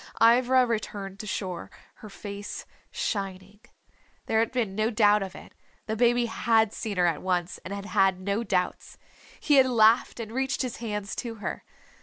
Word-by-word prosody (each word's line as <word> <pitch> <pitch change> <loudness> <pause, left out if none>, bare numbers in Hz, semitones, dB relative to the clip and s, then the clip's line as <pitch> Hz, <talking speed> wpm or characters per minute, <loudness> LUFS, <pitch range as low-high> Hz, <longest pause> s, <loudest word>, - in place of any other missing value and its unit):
Ivra 250 +2 +5
returned 205 -4 -4
to 215 - -6
shore, 185 -4 -4 0.3
her 215 - -11
face 200 +1 -7 0.2
shining. 195 -1 -4 0.7
There 220 - +1
had 225 - +1
been 235 -6 -1
no 215 +2 +1
doubt 210 -2 +4
of 190 -1 -5
it - - -12 0.3
the 220 - -2
baby 240 +1 +3
had 225 -1 +2
seen 210 -4 -4
her 180 - +4
at 165 -3 0
once, 180 -1 -1
and 185 - -9
had 200 0 -5
had 195 -2 +2
no 200 +4 -1
doubts. 180 -5 -2 0.4
He 295 -2 +3
had 265 -1 +6
laughed 230 0 +4
and 220 -2 -6
reached 265 +2 -1
his 250 -2 -4
hands 210 -3 -4
to 235 -2 -4
her. 210 - -5
215 Hz, 175 wpm, -27 LUFS, 195-235 Hz, 0.7 s, had